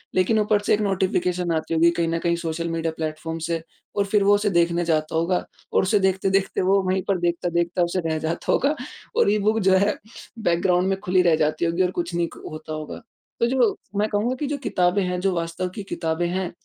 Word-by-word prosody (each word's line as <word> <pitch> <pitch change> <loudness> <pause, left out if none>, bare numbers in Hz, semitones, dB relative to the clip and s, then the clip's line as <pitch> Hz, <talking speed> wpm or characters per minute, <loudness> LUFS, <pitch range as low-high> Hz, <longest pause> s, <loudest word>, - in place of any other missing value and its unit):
लेकिन 185 +4 +3
ऊपर 210 0 +2
से - - +1
एक 205 - +2
नोटिफ़िकेशन 180 -3 0
आती 160 +1 -2
होगी 165 +1 +5
कहीं 170 -1 -1
न 165 0 -1
कहीं 170 0 +1
सोशल 165 0 -3
मीडिया 165 0 -1
प्लेटफ़ॉर्म 160 +1 -4
से 165 -1 -1 0.3
और 200 - +1
फिर 200 0 +2
वो 205 +1 +5
उसे 205 0 +1
देखने 170 -1 +2
जाता 155 -1 0
होगा 170 +3 +1 0.3
और - - +4
उसे 200 +2 +2
देखते-देखते 190 0 +1
वो 195 +2 +3
वहीं 185 +1 +1
पर 195 - +2
देखता-देखता 170 0 0
उसे 175 +2 -1
रह 160 - 0
जाता 160 +2 -2
होगा। 290 +3 +2 0.4
और - - +4
ई 215 - +2
बुक 215 +2 +2
जो - - +5
है 200 +2 +2 0.4
बैकग्राउंड 180 -1 +2
में 195 - 0
खुली 185 -1 +2
रह 170 -3 +4
जाती 155 +1 0
होगी 170 +2 0
और 180 - 0
कुछ 175 -1 -3
नहीं 170 0 +1
क - - -13
होता 155 0 -7
होगा। 155 -1 -6 0.4
तो 235 - +3
जो 245 -4 +2 0.2
मैं 210 +1 +2
कहूँगा 220 +5 0
कि 295 - -1
जो 290 0 -2
किताबें 180 +2 +1
हैं, 180 0 -2
जो 190 0 +1
वास्तविक 170 +2 -3
की 205 - -6
किताबें 170 -3 -2
हैं 185 0 -2
180 Hz, 225 wpm, -23 LUFS, 170-195 Hz, 0.4 s, होगी